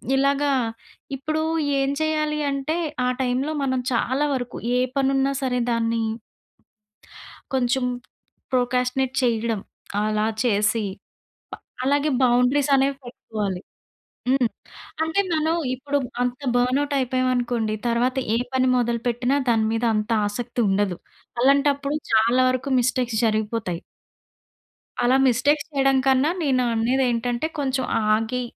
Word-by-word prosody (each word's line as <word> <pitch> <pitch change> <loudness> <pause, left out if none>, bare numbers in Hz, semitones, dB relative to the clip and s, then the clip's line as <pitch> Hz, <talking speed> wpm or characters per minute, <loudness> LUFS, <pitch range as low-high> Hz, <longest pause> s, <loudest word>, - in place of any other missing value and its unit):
ఇలాగా 280 +1 +2 0.7
ఇప్పుడు 310 +4 -2 0.4
ఏం 275 0 +1
చేయాలి 305 -1 0
అంటే 275 +3 -2 0.3
ఆ - - +2
టైమ్‌లో 260 +4 0
మనం 260 -1 0
చాలా 260 +4 +1
వరకు 245 -2 -4 0.2
ఏ - - +3 0.2
పని 270 -1 +2
ఉన్నా 270 +1 +2
సరే 250 -1 0
దాన్ని 230 0 0 1.5
కొంచెం 255 0 +1 0.7
ప్రోక్రాస్టినేట్ 250 +1 0
చేయడం. 230 -3 0 0.4
అలా 215 0 0 0.2
చేసి, 215 -1 +1 0.9
బ - - -6
అలాగే 285 +3 +2
బౌండరీస్ 250 +3 +3
అనేవి 275 +1 +2
పెట్టుకోవాలి. 210 -6 -4 0.7
హ్మ్. 255 -3 +3 0.5
అంటే 320 +5 +1
మనం 315 +1 +1 0.2
ఇప్పుడు 285 +2 -1 0.2
అంత 250 +2 -2 0.2
బర్న్అవుట్ 265 +4 +1
అయిపోయామనుకోండి, 245 -3 0
తరువాత 245 +2 +1 0.2
ఏ - - +3 0.2
పని 260 0 +2
మొదలుపెట్టిన 240 +1 0 0.2
దాని 225 -2 +3
మీద 225 +1 -1
అంత 215 +1 -1 0.2
ఆసక్తి 240 +3 -4
ఉండదు. 195 -2 0 0.4
అలాంటప్పుడు 280 +2 +2 0.2
చాలా 230 +3 +4
వరకు 255 +2 -2
మిస్టేక్స్ 245 -2 0
జరిగిపోతాయి... 215 -5 -1 1.2
అలా 255 +2 +4
మిస్టేక్స్ 285 +4 +2
చేయడం 270 -1 +3
కన్నా 265 +3 +4
నేను 260 -3 +2
అనేది 250 +4 +1
ఏంటంటే, 240 +4 -1
కొంచెం 265 -2 0 0.3
ఆగి 225 +3 -1
255 Hz, 115 wpm, -23 LUFS, 235-275 Hz, 1.5 s, చాలా